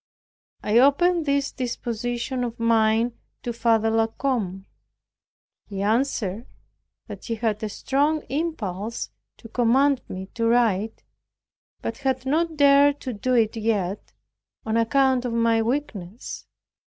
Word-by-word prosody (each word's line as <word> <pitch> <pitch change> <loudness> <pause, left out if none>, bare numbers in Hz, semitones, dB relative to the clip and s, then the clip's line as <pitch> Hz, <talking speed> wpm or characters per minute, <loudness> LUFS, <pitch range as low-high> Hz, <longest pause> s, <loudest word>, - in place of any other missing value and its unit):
I 215 +3 +4
opened 320 +5 +3
this 280 0 +1
disposition 245 0 -3
of 235 -1 -5
mine 230 +1 +2 0.2
to 240 - -3
Father 225 -1 +2
La 225 0 +2
Combe. 220 -7 -2 1.0
He 195 -1 -4
answered 225 -2 0 0.6
that - - -9
he 230 - -2
had 220 -2 -1
a 215 - -2
strong 290 +8 0
impulse 230 - -3 0.3
to 230 - -12
command 255 +4 +2
me 190 +1 -5
to 230 0 0
write, 225 -3 +1 0.8
but 230 +3 -4
had 265 -1 -1
not 320 +3 0
dared 285 0 +5
to 255 - -4
do 250 +5 0
it 225 -2 +2
yet, 210 -4 -2 0.5
on 220 0 -1
account 260 +2 +3
of 245 -2 -3
my 230 -1 +2
weakness. 230 -5 -4
235 Hz, 125 wpm, -24 LUFS, 220-270 Hz, 1.0 s, dared